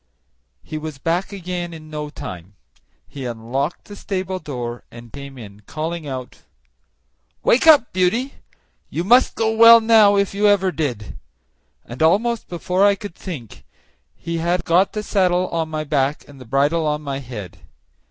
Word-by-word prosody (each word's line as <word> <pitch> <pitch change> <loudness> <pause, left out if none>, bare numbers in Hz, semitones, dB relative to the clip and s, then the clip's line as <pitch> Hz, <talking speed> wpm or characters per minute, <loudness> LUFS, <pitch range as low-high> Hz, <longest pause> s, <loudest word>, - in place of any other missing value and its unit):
He 155 - -6
was 155 -2 -7
back 170 +8 -1
again 175 -3 -5
in 155 -1 -12
no 150 -1 -5
time; 90 - -9 0.5
he 135 -3 -7
unlocked 120 +7 -3
the 205 - -10
stable 190 -2 -4
door, 120 -6 -6
and 120 -1 -13
came 140 -1 -9
in, 105 -4 -11
calling 160 0 -4
out, 130 -2 -7 1.0
"Wake 260 +7 +3
up, 295 -7 +6
Beauty! 225 +9 +1 0.6
You 170 - -3
must 245 +7 +4
go 225 0 0
well 230 +1 +9
now, 220 -2 +5
if 200 -1 +1
ever 205 -1 +3
you - - -3
did;" 125 - -4 0.7
and 120 +4 -9
almost 220 +9 +2
before 180 +2 0
I 200 0 +5
could 200 -2 -8
think 140 - -9 0.5
he 170 0 -4
had 175 +1 0
got 180 +4 +3
the 210 - -3
saddle 185 -3 +1
on 165 -1 -2
my 155 -1 -3
back 145 -1 -1
and 140 -2 -14
the - - -10
bridle 145 +6 +1
on 150 0 -1
my 140 -1 -4
head. 115 -9 -9
165 Hz, 160 wpm, -20 LUFS, 135-195 Hz, 1.0 s, well